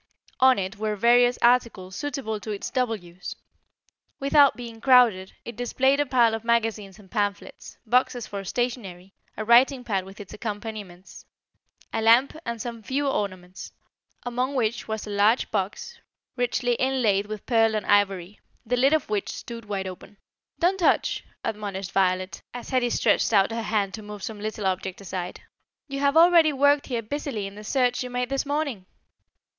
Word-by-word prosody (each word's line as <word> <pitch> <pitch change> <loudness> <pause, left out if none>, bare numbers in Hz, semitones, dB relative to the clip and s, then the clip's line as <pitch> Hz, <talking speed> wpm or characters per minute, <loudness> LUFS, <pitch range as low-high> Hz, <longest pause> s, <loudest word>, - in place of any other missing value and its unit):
On 260 0 +6
it 195 +2 -3
were 215 0 -2
various 245 +3 +4
articles 235 -6 +2
suitable 265 -6 -3
to 215 - -9
its 205 -2 -4
double 250 -3 0
use. 175 -2 -9 0.8
Without 280 0 +5
being 230 -2 -9
crowded, 240 -8 +4
it 235 - -7
displayed 265 +4 +1
a 290 - +1
pile 240 -3 +3
of 225 0 -4
magazines 225 -4 0
and 195 -3 -18
pamphlets, 205 -2 -3
boxes 245 0 +1
for 200 -1 -6
stationery, 195 -4 -4 0.2
a 215 - -3
writing 250 +3 +5
pad 195 -5 -1
with 195 +3 -13
its 205 - -10
accompaniments, 205 -4 -7 0.7
a - - 0
lamp, 235 +6 +4
and 235 -1 -3
some 230 0 -6
few 275 +6 -1
ornaments, 185 -7 -4 0.5
among 250 +3 -2
which 235 -1 -1
was 220 -1 -4
a 210 - -7
large 205 +4 +2
box, 210 - -3 0.4
richly 245 0 0
inlaid 230 -7 +1
with 215 -1 -7
pearl 225 -2 +3
and 215 - -2
ivory, 200 -1 +1 0.3
the 250 +2 0
lid 270 +4 +4
of 310 -3 +1
which 210 -2 -2
stood 230 -2 -7
wide 200 -2 -3
open. 185 +2 -9 0.4
"Don't 370 +3 +1
touch," 345 - +2 0.2
admonished 200 -3 -4
Violet, 185 -1 0
as 245 - -7
Hetty 250 -2 +2
stretched - - +2
out 200 -1 +4
her 230 0 -2
hand 210 -3 -1
to 220 - -6
move 210 -1 -9
some 220 -2 -6
little 215 -1 -4
object 190 0 -2
aside. 185 -2 -6 0.5
"You 275 -1 -5
have 280 +2 +2
already 335 -2 +6
worked 285 +1 +3
here 235 -3 -2
busily 260 -3 -4
in 195 - -7
the 210 +1 -10
search 245 +2 +1
you 250 - -4
made 250 0 -2
this 275 +1 -1
morning." 285 -10 -2
225 Hz, 170 wpm, -25 LUFS, 200-250 Hz, 0.8 s, On